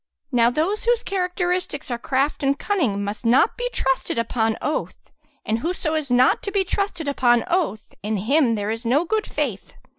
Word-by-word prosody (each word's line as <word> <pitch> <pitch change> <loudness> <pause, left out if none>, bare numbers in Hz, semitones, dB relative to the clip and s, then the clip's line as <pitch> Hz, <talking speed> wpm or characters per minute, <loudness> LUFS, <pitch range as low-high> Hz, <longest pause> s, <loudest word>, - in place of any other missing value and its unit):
Now 235 -1 +4
those 330 - -1
whose 480 0 +2
characteristics 360 -6 -2
are 240 - -2
craft 270 +4 0
and 275 0 +1
cunning, 260 - 0
must 205 +4 -5
not 240 +3 +4
be - - -2
trusted 265 - -1
upon 225 -1 0
oath; 305 - -2 0.5
and 220 +1 0
whoso 325 +1 -2
is 310 -3 -1
not 250 +1 +4
to 400 - -4
be 395 -1 +2
trusted 380 -4 -2
upon 245 -4 +3
oath, 345 - -1
in 215 +1 -2
him 240 +4 +2
there 205 0 -2
is 225 +1 -4
no 265 +8 +2
good 430 +4 -1
faith. - - -3
280 Hz, 180 wpm, -22 LUFS, 230-360 Hz, 0.5 s, Now